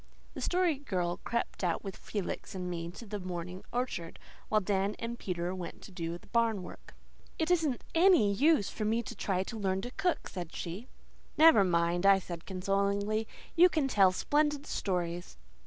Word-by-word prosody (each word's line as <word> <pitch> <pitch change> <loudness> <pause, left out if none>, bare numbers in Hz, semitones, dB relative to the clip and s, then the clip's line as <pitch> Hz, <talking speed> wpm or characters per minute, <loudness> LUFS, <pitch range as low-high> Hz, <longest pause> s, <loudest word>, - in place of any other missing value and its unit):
The - - -6
Story 355 -5 +1
Girl 180 -10 -2
crept 235 -3 -2
out 175 -2 0
with 195 -2 -6
Felix 200 -1 -5
and 180 -1 -4
me 170 -1 -4
to 195 +7 -10
the 210 -1 -5
morning 180 0 -5
orchard, 240 -9 -3 0.3
while 215 - +4
Dan 200 0 0
and 235 +1 -5
Peter 175 -1 -2
went 180 -3 -7
to - - -11
do 170 -2 -4
the - - -20
barn 230 -5 +1
work. - - -12 0.4
"It 320 +2 0
isn't 315 -8 +1
ANY 330 - +5
use 285 - +4
for 215 - -4
me 225 +2 +1
to 235 - -7
try 190 -2 0
to 225 +3 -6
learn 190 -1 0
to 245 - -5
cook," 365 +1 -1
she - - -13
said. 175 +4 -5 0.5
"Never 315 -9 +8
mind," 175 +1 +2
I 195 -1 +8
said 175 -3 -7
consolingly. 200 +3 0 0.3
"You 355 +2 +7
can 310 -5 +1
tell 195 -7 +5
splendid 295 +7 +1
stories." 175 - -3
200 Hz, 180 wpm, -31 LUFS, 180-245 Hz, 0.5 s, Never